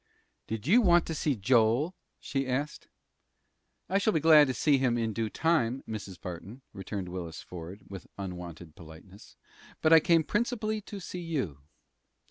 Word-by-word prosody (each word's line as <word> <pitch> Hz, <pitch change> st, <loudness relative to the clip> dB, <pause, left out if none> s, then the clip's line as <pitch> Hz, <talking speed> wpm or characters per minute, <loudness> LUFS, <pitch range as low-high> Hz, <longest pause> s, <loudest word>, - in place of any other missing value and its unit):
"Did 110 Hz, -1 st, -4 dB
you 215 Hz, -, +5 dB
want 175 Hz, -5 st, +4 dB
to 165 Hz, -, -4 dB
see 150 Hz, -2 st, 0 dB
Joel?" 120 Hz, -, +2 dB, 0.3 s
she 135 Hz, -1 st, -2 dB
asked. 140 Hz, +4 st, -3 dB, 1.0 s
"I 195 Hz, +3 st, +1 dB
shall 215 Hz, +2 st, +1 dB
be 160 Hz, -, +2 dB
glad 155 Hz, -1 st, +7 dB
to 130 Hz, -, -1 dB
see 145 Hz, -3 st, +3 dB
him 125 Hz, -2 st, +1 dB
in 115 Hz, -2 st, -1 dB
due 110 Hz, 0 st, -2 dB
time, 135 Hz, -4 st, +1 dB
Mrs. 105 Hz, -4 st, -7 dB
Barton," 95 Hz, +8 st, -8 dB
returned 95 Hz, 0 st, -5 dB
Willis 85 Hz, -3 st, -6 dB
Ford, 90 Hz, +3 st, -9 dB
with 95 Hz, -2 st, -9 dB
unwonted 90 Hz, -4 st, -7 dB
politeness; 85 Hz, +5 st, -14 dB, 0.4 s
"but 160 Hz, -, +4 dB
I 165 Hz, -, +10 dB
came 165 Hz, +1 st, +3 dB
principally 215 Hz, -, -1 dB
to 205 Hz, 0 st, -8 dB
see 180 Hz, -1 st, -7 dB
you." 135 Hz, -, -3 dB
125 Hz, 160 wpm, -29 LUFS, -, 1.0 s, I